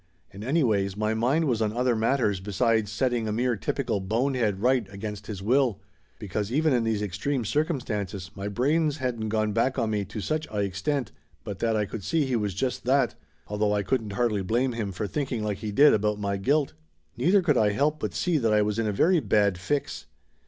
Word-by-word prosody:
And 100 Hz, +2 st, -8 dB
anyways, 110 Hz, -, +1 dB
my 110 Hz, +1 st, 0 dB
mind 130 Hz, +9 st, +1 dB
was 120 Hz, -6 st, 0 dB
on 105 Hz, -1 st, 0 dB
other 125 Hz, -1 st, +2 dB
matters 110 Hz, -3 st, +1 dB
be 100 Hz, +2 st, -7 dB
sides 110 Hz, 0 st, +2 dB
setting 120 Hz, 0 st, 0 dB
a -, -, -1 dB
mere 120 Hz, +2 st, +1 dB
typical 100 Hz, -, -2 dB
bonehead 110 Hz, 0 st, 0 dB
right 125 Hz, -2 st, +1 dB
against 105 Hz, +1 st, -6 dB
his 100 Hz, -3 st, -6 dB
will, 125 Hz, -1 st, +2 dB, 0.4 s
because 105 Hz, +2 st, -3 dB
even 155 Hz, +2 st, +2 dB
in 120 Hz, -2 st, +2 dB
these 110 Hz, -2 st, 0 dB
extreme 110 Hz, +6 st, -2 dB
circumstances 105 Hz, -, -2 dB
my 100 Hz, +2 st, -5 dB
brains 145 Hz, +8 st, +1 dB
hadn't 120 Hz, -5 st, -2 dB
gone 110 Hz, -1 st, 0 dB
back 130 Hz, +4 st, +1 dB
on 115 Hz, -3 st, 0 dB
me 105 Hz, -1 st, 0 dB
to 100 Hz, -, -7 dB
such 155 Hz, +8 st, -2 dB
a 105 Hz, -, -4 dB
extent 100 Hz, +7 st, -2 dB, 0.3 s
but 100 Hz, -2 st, -6 dB
that 115 Hz, -1 st, +1 dB
I 105 Hz, -1 st, +1 dB
could 100 Hz, 0 st, -7 dB
see 160 Hz, -, +1 dB
he 130 Hz, -2 st, -1 dB
was 105 Hz, -5 st, -1 dB
just 125 Hz, +4 st, -2 dB
that, 130 Hz, -1 st, +3 dB, 0.3 s
although 105 Hz, 0 st, 0 dB
I 100 Hz, -, 0 dB
couldn't 105 Hz, 0 st, -1 dB
hardly 105 Hz, -2 st, +1 dB
blame 120 Hz, +7 st, 0 dB
him 110 Hz, -4 st, -3 dB
for 95 Hz, +3 st, -3 dB
thinking 125 Hz, -1 st, -2 dB
like 105 Hz, -2 st, -2 dB
he 105 Hz, -, -4 dB
did 145 Hz, +8 st, +6 dB
about 105 Hz, 0 st, +1 dB
my 100 Hz, -1 st, -1 dB
guilt. 140 Hz, +8 st, +1 dB, 0.4 s
Neither 190 Hz, +2 st, +3 dB
could 150 Hz, -5 st, +3 dB
I 105 Hz, -2 st, +3 dB
help 145 Hz, +8 st, +1 dB
but -, -, -4 dB
see 175 Hz, -4 st, +1 dB
that 115 Hz, -4 st, +1 dB
I 105 Hz, 0 st, +4 dB
was 105 Hz, +1 st, -1 dB
in 115 Hz, -, 0 dB
a -, -, +1 dB
very 170 Hz, -, +3 dB
bad 100 Hz, -, +2 dB
fix. 140 Hz, +10 st, -3 dB
110 Hz, 215 wpm, -26 LUFS, 105-130 Hz, 0.4 s, did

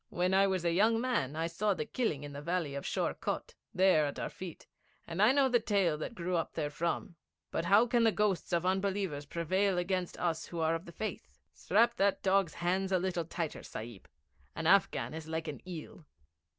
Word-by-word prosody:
When 180 Hz, +2 st, 0 dB
I 195 Hz, +1 st, +5 dB
was 185 Hz, -3 st, -1 dB
a 170 Hz, -, +3 dB
young 220 Hz, +5 st, +4 dB
man 230 Hz, -, 0 dB
I 165 Hz, +1 st, -1 dB
saw 190 Hz, +5 st, 0 dB
the -, -, -3 dB
killing 220 Hz, -, -1 dB
in 145 Hz, 0 st, -7 dB
the 140 Hz, -, -6 dB
valley 170 Hz, -2 st, -1 dB
of 140 Hz, -, -5 dB
Sheor -, -, 0 dB
Kot -, -, -4 dB, 0.2 s
there 180 Hz, -5 st, +4 dB
at 140 Hz, -, -5 dB
our -, -, -3 dB
feet, 180 Hz, -3 st, -9 dB, 0.4 s
and 170 Hz, +3 st, -3 dB
I 215 Hz, +4 st, +7 dB
know 275 Hz, 0 st, +4 dB
the 245 Hz, -2 st, +3 dB
tale 200 Hz, -7 st, +1 dB
that 235 Hz, -, -5 dB
grew 180 Hz, -1 st, -2 dB
up 165 Hz, -, -2 dB
therefrom. 165 Hz, +3 st, -2 dB, 0.3 s
But -, -, -1 dB
how 205 Hz, +6 st, +6 dB
can 240 Hz, 0 st, +2 dB
the 225 Hz, -, +5 dB
ghosts 205 Hz, -4 st, 0 dB
of 170 Hz, 0 st, +1 dB
unbelievers 190 Hz, -6 st, -1 dB
prevail 185 Hz, +4 st, 0 dB
against 180 Hz, 0 st, -1 dB
us 165 Hz, -2 st, -1 dB
who 170 Hz, -, -6 dB
are 160 Hz, 0 st, +2 dB
of 165 Hz, +2 st, -3 dB
the 170 Hz, -, -10 dB
Faith? 190 Hz, -, -5 dB, 0.2 s
Strap 215 Hz, -, +2 dB
that 200 Hz, 0 st, +2 dB
dog's 195 Hz, -3 st, +2 dB
hands 185 Hz, +3 st, 0 dB
a 185 Hz, -, +4 dB
little 175 Hz, -2 st, -1 dB
tighter, 165 Hz, -1 st, -4 dB
Sahib. 110 Hz, -2 st, -8 dB, 0.5 s
An 165 Hz, -, -4 dB
Afghan 190 Hz, -3 st, +3 dB
is 160 Hz, 0 st, -7 dB
like 160 Hz, 0 st, -3 dB
an 150 Hz, -, -6 dB
eel.' 160 Hz, -2 st, -8 dB
180 Hz, 210 wpm, -32 LUFS, 160-195 Hz, 0.5 s, I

